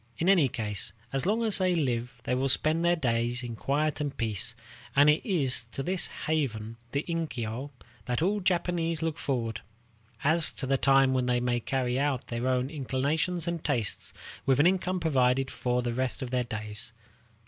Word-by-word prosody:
In 170 - -1
any 175 -8 +5
case, 110 -6 -2 0.2
as 135 +5 0
long 220 +3 +1
as 215 -3 +3
they 185 -1 +2
live 125 -5 -2
they 125 - -1
will 130 +2 +1
spend 155 +5 +2
their 175 0 +4
days 120 -4 0
in 120 -1 -5
quiet 150 +5 -1
and 145 -2 -3
peace; 115 0 -1 0.4
and 145 +2 +7
it 150 - 0
is 140 - +2
to 135 - -3
this 180 +3 +2 0.2
haven, 115 -8 -1
the 140 +1 -1
inkyo, 140 -7 -3 0.4
that 125 -1 0
all 195 +6 +1
Japanese 170 -3 0
look 160 -1 -2
forward, 115 -5 -2 0.6
as 160 +2 +6
to 135 - -5
the 135 +1 +2
time 135 0 +4
when 130 -1 0
they 125 0 +2
may 120 0 0
carry 125 +1 -1
out 140 -3 0
their 120 +1 -2
own 130 0 +1
inclinations 155 +5 -1
and 170 -2 -3
tastes 120 -9 0 0.3
with 135 0 +2
an 145 - +5
income 185 0 +1
provided 135 -4 +2
for 125 0 -1
the 120 -1 -2
rest 130 +2 -2
of 125 - -6
their 125 -1 0
days. 110 +1 -5
135 Hz, 185 wpm, -28 LUFS, 125-160 Hz, 0.6 s, and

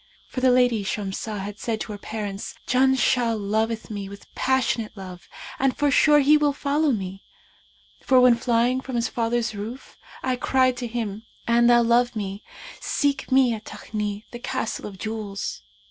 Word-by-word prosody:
For 255 - -5
the 260 - +5
lady 245 -4 +3
Shamsah 205 +1 -3
had 205 +1 -7
said 225 -2 -2
to - - -5
her 205 - -7
parents, 205 -2 -5
'Janshah 255 -2 +3
loveth 220 +2 -1
me 200 -2 -5
with 200 0 -13
passionate 245 -4 0
love 185 -2 -10 0.3
and 270 -1 +1
forsure 290 +1 +5
he 295 +2 +6
will 295 -1 +2
follow 290 +2 +1
me; 195 -4 -4 0.8
for 260 -1 +4
when 250 -1 +7
flying 240 +2 +1
from 260 -1 -6
his 235 -1 +1
father's 230 -1 -1
roof 220 +6 -8 0.2
I 255 -1 0
cried 255 0 +2
to 245 -1 -3
him, 225 -2 -4 0.2
'An 235 0 +4
thou 240 0 +6
love 240 +1 +3
me, 200 -1 -4 0.4
seek 285 -2 -1
me 260 -2 +5
at 215 -1 -7
Takni, 210 -1 -5
the 240 - -7
Castle 230 -3 -3
of 195 -2 -10
Jewels!' 215 -2 -4
235 Hz, 165 wpm, -24 LUFS, 210-255 Hz, 0.8 s, when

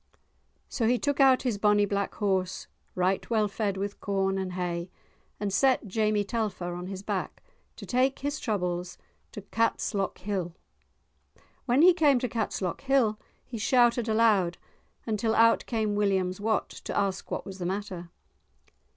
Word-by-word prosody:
So 230 -5 -1
he 245 +2 +3
took 285 +2 -1
out 265 -2 +5
his 235 -6 -1
bonny 210 0 +4
black 200 0 -2
horse, 190 -3 -1 0.3
right 185 +1 0
well 220 -2 +2
fed 200 -1 -2
with 200 +1 -4
corn 195 -1 0
and 185 -1 -4
hay, 175 -1 -3 0.5
and 205 -2 -2
set 260 -1 +3
Jamie 210 +1 +1
Telfer 200 -5 -3
on 175 +1 -6
his 190 0 -6
back, - - -4 0.3
to - - -9
take 260 +2 +1
his 285 +1 -3
troubles 180 -4 -2 0.3
to 210 - -8
Catslockhill. 200 -4 -1 1.1
When 255 +5 +4
he 365 +1 +8
came 300 -6 +4
to 250 - -1
Catslockhill 220 +2 0 0.3
he 235 -3 -7
shouted 240 0 +3
aloud 215 -6 +3 0.5
until 220 0 0
out 230 0 +4
came 220 -3 0
William's 195 -2 0
Wat 220 0 0
to - - -6
ask 195 -2 -1
what - - -4
was 190 -1 -8
the 175 - -2
matter. 185 -3 -4
205 Hz, 150 wpm, -28 LUFS, 190-230 Hz, 1.1 s, he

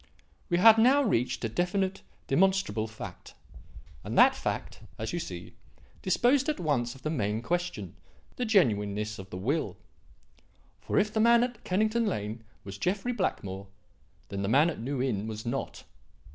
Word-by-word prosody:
We 175 - +2
had 225 +4 +8
now 265 +5 +5
reached 125 - 0
a - - +1
definite, 190 - -1 0.2
demonstrable 155 - +2
fact; 105 -4 -10 0.7
and - - -4
that - - +7
fact, - - -4 0.2
as 110 +6 -4
you 175 - -1
see, 90 - -7 0.5
disposed 255 +9 +2
at 305 - -1
once 130 -7 0
of 135 - -16
the 155 - -1
main 110 -5 -1
question 175 - -3 0.4
the 250 - -2
genuineness 105 - +1
of 95 0 -9
the 90 - -6
will. 135 - -1 1.0
For - - -2
if 210 +1 +2
the 220 - 0
man 235 +1 +5
at 245 -3 -4
Kennington 215 +4 +1
Lane 110 - -3 0.2
was 100 0 -8
Jeffrey 200 - -1
Blackmore, 100 - -3 0.6
then 100 0 -4
the 100 - -1
man 145 +8 +4
at - - -8
New 130 +2 -2
Inn 110 -5 -1
was 110 0 -6
not. 135 +3 -4
140 Hz, 160 wpm, -29 LUFS, -, 1.0 s, had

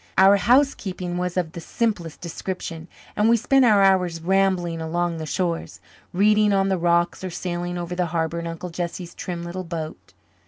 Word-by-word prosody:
Our 195 +1 +7
housekeeping 195 -7 +1
was 180 0 -2
of 170 -3 0
the 170 - -8
simplest 185 -5 -2
description 170 -1 -5 0.3
and 210 +2 +3
we 235 - +5
spent 265 +3 +3
our 210 -4 +5
hours 180 -3 +3
rambling 180 -2 +1
along 170 +1 -1
the 160 -1 -5
shores, 170 0 -2 0.3
reading 210 +2 +3
on 195 0 +2
the 190 - +1
rocks 170 +1 +1
or 185 - -3
sailing 175 0 -4
over 175 0 -4
the 180 0 0
harbour 165 0 -1
in 170 - -5
Uncle 170 +2 -6
Jesse's 175 0 -5
trim 175 -2 -5
little 175 +2 -5
boat. 165 -3 -7
175 Hz, 180 wpm, -23 LUFS, 170-195 Hz, 0.3 s, Our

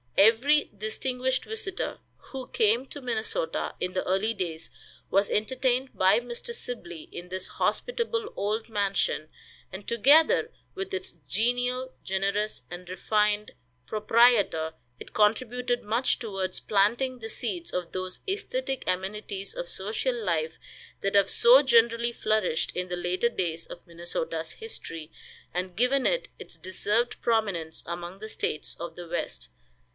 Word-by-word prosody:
Every 240 +9 +5
distinguished 250 +5 -1
visitor 410 -3 -3 0.3
who 265 -2 -5
came 225 +4 +2
to 285 - -8
Minnesota 250 - -2
in 180 0 -2
the 185 - 0
early 195 +5 +2
days 170 -5 -4 0.4
was 200 +1 +3
entertained 255 +3 +1
by 190 +4 +5
Mr. 245 - -6
Sibley 175 - -6
in 175 +1 -8
this 185 0 -4
hospitable 470 -2 -1
old 215 +2 -1
mansion, 200 -7 0 0.4
and, 190 +2 -8
together 280 +8 +5 0.2
with 385 0 -5
its 380 0 -4
genial, 245 +4 0
generous 200 +3 -1
and 175 +1 -8
refined 210 +3 +1 0.3
proprietor, 215 - +4 0.3
it - - -11
contributed 245 +3 +2
much 230 +5 +2
towards 195 -5 -3
planting 235 +6 +2
the 225 -1 -6
seeds 335 +10 -3
of 180 -2 -3
those 185 0 -4
aesthetic 400 - -2
amenities 195 +1 -2
of 175 - -5
social 215 +8 -1
life 165 -8 -1 0.4
that 195 0 0
have 200 -1 +5
so 250 +3 +7
generally 235 -2 +4
flourished 215 -8 +1
in 180 0 -2
the 180 - -2
later 180 +6 +1
days 170 -7 -2
of 175 - -10
Minnesota's 165 -1 -4
history 165 - -7 0.4
and 180 0 -3
given 250 +4 +3
it - - +1
its - - -9
deserved 210 +6 0
prominence 200 -9 0
among 175 +2 -5
the 215 +1 -7
states 155 - -2
of 170 +1 -6
the 175 -1 -8
West. 65 - -4
215 Hz, 135 wpm, -28 LUFS, 185-250 Hz, 0.4 s, so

